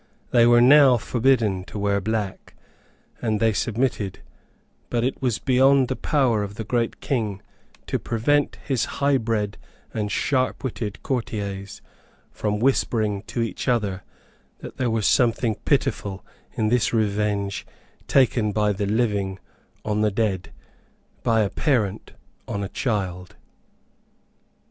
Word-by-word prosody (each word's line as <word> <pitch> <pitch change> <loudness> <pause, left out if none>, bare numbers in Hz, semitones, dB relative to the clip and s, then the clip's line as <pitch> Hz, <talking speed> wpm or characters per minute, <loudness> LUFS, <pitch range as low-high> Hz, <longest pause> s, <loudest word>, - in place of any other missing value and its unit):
They 120 -1 +5
were 120 0 +6
now 135 0 +7
forbidden 115 -5 +1
to - - -8
wear 100 0 +1
black; 105 -1 -3 0.7
and 110 -3 0
they 110 0 +3
submitted; 110 -3 -1 0.7
but 120 -1 0
it 130 - -2
was 125 -4 +1
beyond 135 0 +4
the 130 - -1
power 125 -8 +1
of 100 0 -5
the 110 - -4
great 115 +1 -1
King 110 -7 -1 0.5
to - - -2
prevent 145 +6 +1
his 135 -5 0
highbred 115 -7 0 0.4
and 105 -1 -2
sharpwitted 130 -5 -1
courtiers 100 -5 -4 0.5
from 105 -1 -2
whispering 110 -4 +1
to 120 - -1
each 115 - -5
other 105 -7 0 0.6
that - - -10
there 125 -2 0
was 110 -2 0
something 115 -2 +3
pitiful 125 -9 0 0.3
in 110 -1 0
this 120 -1 +2
revenge 105 -2 -1 0.4
taken 120 -5 +3
by 105 0 +1
the 100 +1 -2
living 100 -3 0 0.5
on 105 0 0
the 105 - +3
dead, 100 -3 -1 0.7
by 115 -1 +2
a 100 - +1
parent 110 -9 -1 0.3
on 100 0 -3
a 95 - -4
child. 95 -8 -3
110 Hz, 130 wpm, -23 LUFS, 105-125 Hz, 0.7 s, now